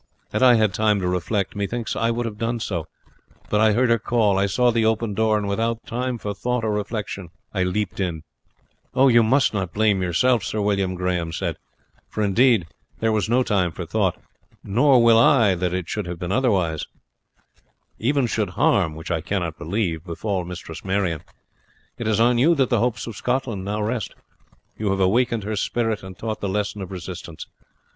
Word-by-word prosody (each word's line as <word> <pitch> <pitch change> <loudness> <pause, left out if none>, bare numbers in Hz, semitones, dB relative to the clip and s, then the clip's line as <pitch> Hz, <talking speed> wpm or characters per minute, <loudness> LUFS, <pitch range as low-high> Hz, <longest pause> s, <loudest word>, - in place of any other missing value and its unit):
Had - - -1
I 125 -2 +7
had 110 -4 +2
time 105 +1 +2
to 90 - -1
reflect, 90 +3 -1
methinks 110 +3 -3
I 115 - +1
would 120 +1 -1
have 105 -2 -6
done 115 +1 -1
so; 85 -7 -3 0.6
but 105 - +3
I 110 -1 +5
heard 120 +2 +2
her 115 - +3
call, 105 -3 +2
I 100 - +2
saw 125 +4 +2
the 115 -1 +1
open 110 -1 +1
door, 110 +1 +2
and 105 -1 -2
without 115 +3 -1
time 125 +1 -2
for 105 -2 -4
thought 125 +3 -2
or 110 - 0
reflection 105 -3 -4 0.2
I 95 - 0
leapt 95 +2 -1
in." 85 -5 -2 0.7
"You 130 -3 +6
must 120 +3 +3
not 95 -4 -3
blame 105 -3 +2
yourself, 105 +6 +2
Sir 110 - -3
William," 100 -3 0
Grahame 90 -2 -1
said, - - -3 0.5
"for, 110 - -2
indeed, 110 -1 +3 0.3
there 115 0 +1
was 110 -2 0
no 125 +2 +3
time 95 -7 +1
for - - -6
thought; - - 0 0.4
nor 125 +4 +4
will 115 -1 +6
I 115 -5 +5
that 90 0 -1
it 90 -1 -3
should 105 -4 -3
have 90 0 -5
been 90 +1 -4
otherwise, 95 - +1 1.1
even 135 +3 +1
should 115 - -1
harm, 75 - +2
which 80 +3 -7
I 80 -2 0
cannot 85 -3 -3
believe, 85 -2 -2
befall 95 +2 -3
Mistress 85 -2 -8
Marion. 95 -5 -1 0.8
It 115 - -3
is 110 -1 +2
on 120 +1 +4
you 165 +7 +5
that 135 -3 +1
the 120 - +3
hopes 115 -1 -1
of 115 - -7
Scotland 125 -4 -2
now 105 +1 -2
rest. 110 -1 -3 0.6
You 105 -2 0
have 95 0 0
awakened 115 +3 +2
her 105 +2 -3
spirit 115 +1 -1
and 95 -1 -10
taught 110 0 -4
the 100 - -2
lesson 100 +1 -2
of 95 0 -7
resistance. 85 -2 -7
105 Hz, 195 wpm, -23 LUFS, 95-115 Hz, 1.1 s, I